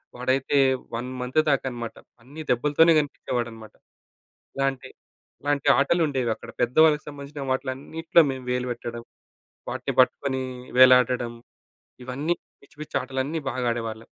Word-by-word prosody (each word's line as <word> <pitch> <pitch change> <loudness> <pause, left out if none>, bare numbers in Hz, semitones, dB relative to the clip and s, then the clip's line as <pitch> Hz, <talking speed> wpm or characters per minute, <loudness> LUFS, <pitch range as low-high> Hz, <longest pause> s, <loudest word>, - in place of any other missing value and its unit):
వాడైతే 130 +3 0 0.4
1 125 +2 -4
మంత్ 125 +5 0
దాక 140 - +2
అన్నమాట 120 -2 -6 0.3
అన్నీ 145 +6 -10
దెబ్బలతోనే 150 +7 +4
కనిపించేవాడన్నమాట. 120 -6 -4 0.8
ఇలాంటి, 135 -1 -1 0.5
ఇలాంటి 145 0 0
ఆటలు 165 +5 +3
ఉండేవి 130 -5 0
అక్కడ. - - -11
పెద్దవాళ్ళకి 150 +5 +4
సంబంధించిన 145 0 -8
వాటిలన్నిట్లో 140 +6 +1
మేము 130 -1 -6
వేలు 125 0 -1
పెట్టడం, 120 0 -7 0.7
వాటిని - - -3
పట్టుకొని 130 +1 -1 0.4
వేలాడడం, 125 -2 +5 0.7
ఇవన్నీ 140 +7 -2 0.3
పిచ్చి, 140 - -22
పిచ్చి 155 - -6
ఆటలన్నీ 135 +4 -3
బాగా 125 0 -3
ఆడేవాళ్ళం. 115 -1 -5
130 Hz, 120 wpm, -25 LUFS, 125-145 Hz, 0.8 s, వేలాడడం